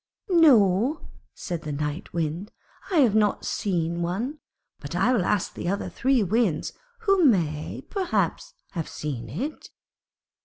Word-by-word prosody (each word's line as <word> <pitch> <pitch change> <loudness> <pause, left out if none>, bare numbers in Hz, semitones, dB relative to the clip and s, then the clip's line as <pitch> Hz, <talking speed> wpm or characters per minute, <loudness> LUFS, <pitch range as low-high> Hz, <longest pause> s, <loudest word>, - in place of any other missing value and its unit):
'No,' 260 - +4 0.3
said 175 -3 -4
the 155 - -5
Night 150 +2 -4
Wind, 170 +4 -3 0.4
'I 380 - -1
have 235 -6 +4
not 210 -2 +2
seen 170 -3 -1
one; 225 - -2 0.4
but 145 +3 -7
I 195 +8 +3
will 220 -7 +2
ask 210 -3 0
the - - -5
other 200 +2 -2
three 260 -3 +2
Winds, 200 -4 0 0.3
who 390 -4 +3
may, 165 - +1
perhaps, 395 +5 -1 0.2
have 165 -4 -4
seen 125 -7 -5
it.' 250 - -5
195 Hz, 140 wpm, -25 LUFS, 165-255 Hz, 0.4 s, No